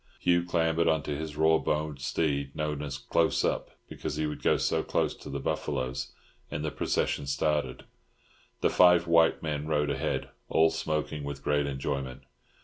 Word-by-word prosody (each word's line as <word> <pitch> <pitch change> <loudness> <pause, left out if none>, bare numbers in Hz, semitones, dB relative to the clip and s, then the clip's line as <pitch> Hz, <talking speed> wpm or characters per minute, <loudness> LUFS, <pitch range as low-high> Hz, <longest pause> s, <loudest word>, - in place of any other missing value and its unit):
Hugh 85 0 +3
clambered 85 -1 +1
on 80 -2 +2
to 75 - -3
his 75 0 -5
raw 80 +1 +4
boned 75 -2 -1
steed, 70 -2 -1
known 75 -1 -2
as 70 -2 -4
"Close 70 - +1
Up," - - -1 0.2
because - - -5
he 75 +1 -1
would 75 - -4
go - - +3
so - - +1
close - - 0
to - - -11
the 70 - -3
buffaloes, 65 -1 -2 0.4
and 75 +1 -3
the 75 - -1
procession 70 - -1
started. 70 -1 0 0.8
The - - +3
five 90 -1 +6
white 85 -1 +4
men 75 -1 -2
rode 75 -2 +1
ahead, 65 - -2 0.2
all 80 0 +4
smoking 75 -1 -2
with 70 -1 -6
great 75 -1 +1
enjoyment. 70 -1 -3
75 Hz, 170 wpm, -29 LUFS, 70-80 Hz, 0.8 s, five